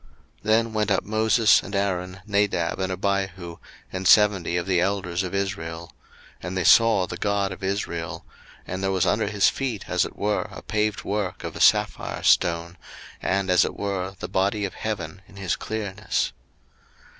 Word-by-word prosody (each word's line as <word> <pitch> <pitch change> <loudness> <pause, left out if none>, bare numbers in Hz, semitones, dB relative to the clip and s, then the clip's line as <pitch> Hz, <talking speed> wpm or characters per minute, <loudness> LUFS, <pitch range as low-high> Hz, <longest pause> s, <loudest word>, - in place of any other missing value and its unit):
02:024:009 - - -26 0.3
Then 110 +1 +2
went 105 -1 0
up 95 - +2
Moses, 110 +1 +4
and 100 - -7
Aaron, 95 -1 -2
Nadab, 100 -5 0
and 95 0 -1
Abihu, 95 -2 -2 0.4
and 95 0 -2
seventy 100 -5 +4
of 85 - -2
the 90 -2 +2
elders 95 -2 -1
of 95 0 -4
Israel: 85 -4 -4 0.5
02:024:010 - - -6
And 95 +1 -4
they 90 - 0
saw 115 -5 +5
the - - -7
God 100 -1 0
of 95 - -9
Israel: 95 -4 -3 0.4
and 95 +1 -5
there 95 0 0
was 95 -2 +1
under 105 0 +1
his 100 -1 +3
feet 125 -7 -4
as 90 -1 +2
it - - -6
were 105 +1 -1
a - - -10
paved 105 -1 -1
work 100 -2 -3
of - - -6
a - - -5
sapphire - - +2
stone, 85 0 +2 0.4
and 95 -1 0
as 90 -2 +5
it - - -4
were 95 -1 -3
the - - -4
body 100 +2 0
of 95 - -5
heaven 95 -5 -5
in - - -17
his 100 -3 -1
clearness. 105 -2 -3
95 Hz, 180 wpm, -24 LUFS, 90-105 Hz, 0.5 s, saw